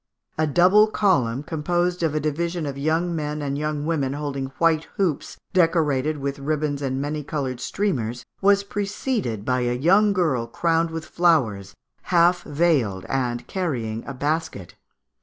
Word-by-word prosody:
A 155 Hz, -, +2 dB
double 185 Hz, +7 st, +5 dB
column, 140 Hz, -, +1 dB
composed 175 Hz, +3 st, -1 dB
of 160 Hz, -2 st, 0 dB
a -, -, +2 dB
division 165 Hz, +3 st, -2 dB
of 140 Hz, -2 st, -4 dB
young 160 Hz, +5 st, 0 dB
men 150 Hz, -1 st, -3 dB
and 140 Hz, -1 st, -2 dB
young 150 Hz, 0 st, -2 dB
women 145 Hz, -5 st, 0 dB
holding 140 Hz, -2 st, -3 dB
white 165 Hz, -2 st, +2 dB
hoops 180 Hz, -8 st, -1 dB, 0.2 s
decorated 155 Hz, -5 st, +2 dB
with 140 Hz, 0 st, -4 dB
ribbons 145 Hz, 0 st, -1 dB
and 135 Hz, -1 st, -2 dB
many 150 Hz, +2 st, -2 dB
coloured 135 Hz, -4 st, -3 dB
streamers, 125 Hz, -, -2 dB, 0.2 s
was 200 Hz, 0 st, +4 dB
preceded 200 Hz, -, -3 dB
by 125 Hz, 0 st, +1 dB
a 120 Hz, 0 st, 0 dB
young 195 Hz, +9 st, +4 dB
girl 155 Hz, -12 st, 0 dB
crowned 165 Hz, +6 st, +1 dB
with 160 Hz, -1 st, -5 dB
flowers, 120 Hz, -, +1 dB, 0.3 s
half 175 Hz, 0 st, +3 dB
veiled, 145 Hz, -, +1 dB
and 125 Hz, -3 st, -1 dB
carrying 120 Hz, -, -3 dB
a 140 Hz, -, -4 dB
basket. 145 Hz, -, -2 dB
150 Hz, 150 wpm, -23 LUFS, 135-175 Hz, 0.3 s, double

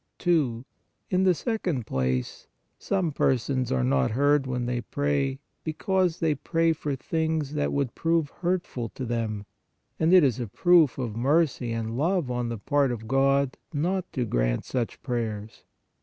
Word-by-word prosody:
2. 135 Hz, -9 st, +1 dB, 0.5 s
In 185 Hz, 0 st, +3 dB
the 185 Hz, -2 st, +4 dB
second 175 Hz, -, -2 dB
place, 65 Hz, -4 st, -2 dB, 0.3 s
SOME 185 Hz, -5 st, 0 dB
PERSONS 130 Hz, -2 st, 0 dB
are 65 Hz, -1 st, +1 dB
not 65 Hz, +1 st, +2 dB
heard 145 Hz, +3 st, +2 dB
when 125 Hz, -1 st, -2 dB
they 120 Hz, 0 st, -1 dB
pray, 140 Hz, 0 st, -1 dB, 0.3 s
because 180 Hz, +2 st, 0 dB
they 160 Hz, -3 st, +2 dB
PRAY 165 Hz, +2 st, +1 dB
FOR 145 Hz, -2 st, -3 dB
38 -, -, -11 dB
PRAYER -, -, -29 dB
THINGS 160 Hz, -3 st, 0 dB
THAT 145 Hz, -1 st, 0 dB
WOULD 140 Hz, -4 st, -1 dB
PROVE 165 Hz, -2 st, +1 dB
HURTFUL 175 Hz, -10 st, -1 dB
TO 130 Hz, -, -4 dB
THEM, 110 Hz, -3 st, -2 dB, 0.5 s
and 160 Hz, +1 st, +3 dB
it 185 Hz, -2 st, +8 dB
is 130 Hz, -4 st, +2 dB
a 120 Hz, -, -3 dB
proof 165 Hz, -, +4 dB
of 120 Hz, -5 st, -3 dB
mercy 135 Hz, -1 st, +1 dB
and 115 Hz, 0 st, -3 dB
love 165 Hz, 0 st, 0 dB
on 120 Hz, -1 st, -1 dB
the 115 Hz, -, -3 dB
part 140 Hz, +5 st, +1 dB
of 110 Hz, -2 st, -5 dB
God 135 Hz, +1 st, +2 dB
not 180 Hz, +5 st, -1 dB
to 125 Hz, -3 st, -1 dB
grant -, -, 0 dB
such 120 Hz, -3 st, -3 dB
prayers. 110 Hz, -4 st, -4 dB
135 Hz, 170 wpm, -26 LUFS, 115-160 Hz, 0.5 s, it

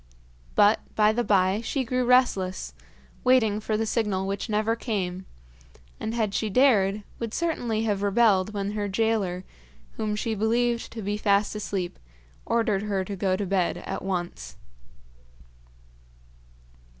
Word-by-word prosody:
But 205 Hz, +2 st, +5 dB, 0.2 s
by 210 Hz, 0 st, +5 dB
and 240 Hz, +2 st, -1 dB
by 195 Hz, +1 st, +3 dB
she 265 Hz, +3 st, -1 dB
grew 250 Hz, +1 st, 0 dB
restless, 240 Hz, -7 st, +2 dB, 0.5 s
waiting 235 Hz, -5 st, +3 dB
for 215 Hz, 0 st, -1 dB
the 225 Hz, -, 0 dB
signal 210 Hz, -4 st, 0 dB
which 200 Hz, +4 st, -3 dB
never 215 Hz, +2 st, +1 dB
came, 190 Hz, -6 st, -3 dB, 0.7 s
and, 220 Hz, +1 st, -3 dB
had 215 Hz, -4 st, 0 dB
she 220 Hz, -, -1 dB
dared, 210 Hz, -4 st, +3 dB, 0.2 s
would 230 Hz, -2 st, -4 dB
certainly 240 Hz, -10 st, -1 dB
have 205 Hz, -3 st, 0 dB
rebelled 205 Hz, -1 st, +3 dB
when 200 Hz, -1 st, -3 dB
her 210 Hz, -1 st, -2 dB
gaoler, 195 Hz, -3 st, 0 dB, 0.5 s
whom 215 Hz, -1 st, -1 dB
she 220 Hz, +1 st, -2 dB
believed 235 Hz, +2 st, 0 dB
to 225 Hz, -2 st, -6 dB
be 205 Hz, +1 st, -1 dB
fast 205 Hz, -1 st, +2 dB
asleep, 200 Hz, -4 st, -4 dB, 0.5 s
ordered 225 Hz, -4 st, +1 dB
her 200 Hz, -2 st, -1 dB
to 200 Hz, -, -5 dB
go 190 Hz, 0 st, +1 dB
to 200 Hz, +1 st, -2 dB
bed 185 Hz, -2 st, 0 dB
at -, -, -5 dB
once. 180 Hz, -2 st, -4 dB
210 Hz, 140 wpm, -26 LUFS, 195-225 Hz, 0.7 s, But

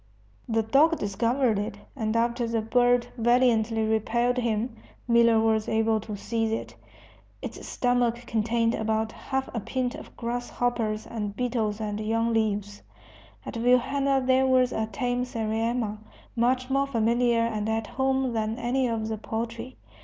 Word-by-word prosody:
The 225 Hz, -1 st, +2 dB
dog 300 Hz, +9 st, +4 dB
discovered 230 Hz, +3 st, +1 dB
it, 205 Hz, 0 st, -4 dB, 0.2 s
and 220 Hz, -3 st, -2 dB
after 235 Hz, +1 st, +1 dB
the 230 Hz, -1 st, -1 dB
bird 245 Hz, +1 st, +3 dB
valiantly 230 Hz, -2 st, +3 dB
repelled 235 Hz, +3 st, +1 dB
him, 230 Hz, 0 st, -1 dB, 0.3 s
Miller 235 Hz, -1 st, +5 dB
was 220 Hz, -1 st, +1 dB
able 220 Hz, 0 st, +2 dB
to 210 Hz, -1 st, -6 dB
seize 225 Hz, +1 st, -1 dB
it. 225 Hz, -, -4 dB, 0.7 s
Its -, -, -6 dB
stomach 245 Hz, -2 st, +1 dB
contained 230 Hz, 0 st, +1 dB
about 220 Hz, 0 st, -1 dB
half 265 Hz, +2 st, -3 dB
a 235 Hz, -, -1 dB
pint 250 Hz, +3 st, -2 dB
of -, -, -11 dB
grass 240 Hz, +1 st, -3 dB
hoppers 225 Hz, -3 st, -1 dB
and 210 Hz, -3 st, -4 dB
beetles 230 Hz, -4 st, -1 dB
and 210 Hz, -1 st, -3 dB
young 225 Hz, +2 st, 0 dB
leaves. 205 Hz, -2 st, -1 dB, 0.6 s
At -, -, -6 dB
Vilhena 265 Hz, +3 st, +2 dB
there 260 Hz, +1 st, +4 dB
was 255 Hz, -1 st, +3 dB
a 220 Hz, 0 st, -1 dB
tame 245 Hz, +3 st, -1 dB
sariema, 225 Hz, -2 st, -2 dB, 0.4 s
much 250 Hz, +2 st, +1 dB
more 275 Hz, +1 st, +2 dB
familiar 235 Hz, -1 st, +2 dB
and 220 Hz, -2 st, -1 dB
at 220 Hz, 0 st, -1 dB
home 265 Hz, 0 st, 0 dB
than 220 Hz, 0 st, -1 dB
any 250 Hz, +2 st, 0 dB
of 225 Hz, -2 st, -2 dB
the 220 Hz, -1 st, -3 dB
poultry. 230 Hz, +3 st, -5 dB
230 Hz, 150 wpm, -26 LUFS, 220-245 Hz, 0.7 s, Miller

